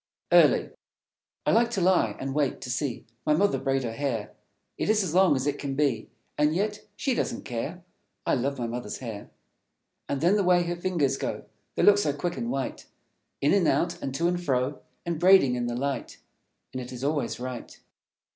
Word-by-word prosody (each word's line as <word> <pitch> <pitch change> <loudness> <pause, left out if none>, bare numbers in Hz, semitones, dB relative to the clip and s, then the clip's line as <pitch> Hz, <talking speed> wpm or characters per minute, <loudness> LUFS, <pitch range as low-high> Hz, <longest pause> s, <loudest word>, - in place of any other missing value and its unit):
Early - - +5 0.7
I - - +3
like 235 +1 +4
to 235 -4 -2
lie 185 +1 +3
and 135 0 -3
wait, 145 -2 0
to 130 -2 -4
see 135 -1 -2 0.2
My 150 - +3
Mother 200 +5 +2
braid 135 -1 0
her 115 - -2
hair. 115 -4 -3 0.4
It - - -2
is 215 -1 +3
as 170 -4 -3
long 185 -4 +5
as 130 0 -1
it 145 0 -1
can 140 -1 -3
be, 140 -4 0 0.3
And 150 +1 +3
yet 210 +3 -2
she 265 +5 0
doesn't - - -2
care. 140 +9 -4 0.4
I - - +2
love 140 +2 0
my 120 - -2
Mother's 120 +1 -4
hair. 110 -5 -7 0.8
And 140 - -1
then 175 +7 +3
the 205 - +2
way 180 -1 +4
her 175 0 -2
fingers 170 -7 0
go; - - -4 0.3
They - - +1
look 205 0 +7
so 150 -8 +1
quick 170 +5 -3
and 235 0 -3
white, 135 - -3 0.5
In 145 - +3
and 190 -5 +3
out, 170 +2 +1
and 135 - -3
to 170 +4 +1
and 175 0 -1
fro, 130 -1 0 0.2
And 170 -2 -2
braiding 180 -7 +6
in 120 -1 -1
the 120 - -2
light; 135 0 -3 0.6
And 130 - -3
it 125 - -8
is 125 0 -7
always 145 -2 -1
right. 125 -1 -7
145 Hz, 205 wpm, -27 LUFS, 130-180 Hz, 0.8 s, look